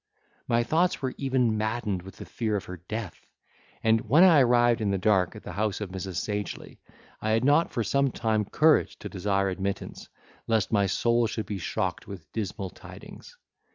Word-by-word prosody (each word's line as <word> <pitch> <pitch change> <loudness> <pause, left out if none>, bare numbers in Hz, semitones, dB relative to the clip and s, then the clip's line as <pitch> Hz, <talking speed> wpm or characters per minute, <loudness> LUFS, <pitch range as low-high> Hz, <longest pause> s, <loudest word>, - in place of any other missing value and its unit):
My 120 0 +2
thoughts 165 +5 +1
were 130 -1 -1
even 125 -5 +1
maddened 110 -3 -2
with 95 +1 -12
the - - -8
fear 110 -3 -2
of 100 -1 -3
her 90 - -8
death; 100 +3 -7 0.6
and, 110 0 +3
when 155 +8 +7
I 170 -5 +7
arrived 120 -2 +4
in 105 - 0
the 100 - +1
dark 95 -2 +2
at - - -10
the - - -7
house 105 +2 -1
of 105 -3 -5
Mrs. 95 -1 -5
Sagely, 105 +2 -4 0.4
I 110 - -1
had 115 +3 +2
not 145 +4 +4
for 115 - -1
some 140 +4 +1
time 110 -3 0
courage 155 +9 +3
to - - -8
desire 100 0 0
admittance, 95 +1 -4 0.4
lest 110 -3 +1
my 100 -3 +3
soul 115 +4 +2
should 110 0 -4
be 100 -2 -4
shocked 80 - -3
with 90 -6 -10
dismal 100 -3 -4
tidings. - - -13
110 Hz, 190 wpm, -27 LUFS, 100-120 Hz, 0.6 s, when